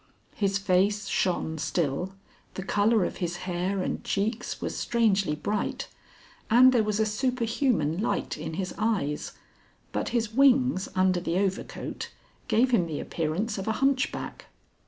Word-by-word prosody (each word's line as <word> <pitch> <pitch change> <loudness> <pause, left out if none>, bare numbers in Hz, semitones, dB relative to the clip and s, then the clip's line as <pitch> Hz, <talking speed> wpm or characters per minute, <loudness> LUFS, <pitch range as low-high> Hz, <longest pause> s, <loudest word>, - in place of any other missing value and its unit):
His 195 -2 +1
face 195 +2 +2
shone 165 -5 0
still, 155 +4 -1 0.4
the 190 - -4
colour 205 +1 +3
of - - -4
his 175 -2 -2
hair 185 +2 -1
and - - -3
cheeks 220 +4 -2
was - - -3
strangely 200 -8 +1
bright, 205 +7 -2 0.6
and 255 +3 +7
there 240 - +4
was 210 0 -1
a 220 - +3
superhuman 230 - 0
light 230 - -1
in 160 - -5
his 185 +1 -3
eyes, 200 -10 -1 0.6
but - - -2
his 230 -2 -1
wings 260 -5 +4
under 185 -1 +3
the 175 0 -1
overcoat 195 -1 -3 0.4
gave 245 +2 +3
him 180 -8 +3
the 155 -3 -4
appearance 185 +7 -2
of 195 - -5
a 220 - +2
hunchback. 270 +2 -1
200 Hz, 145 wpm, -27 LUFS, 180-230 Hz, 0.6 s, and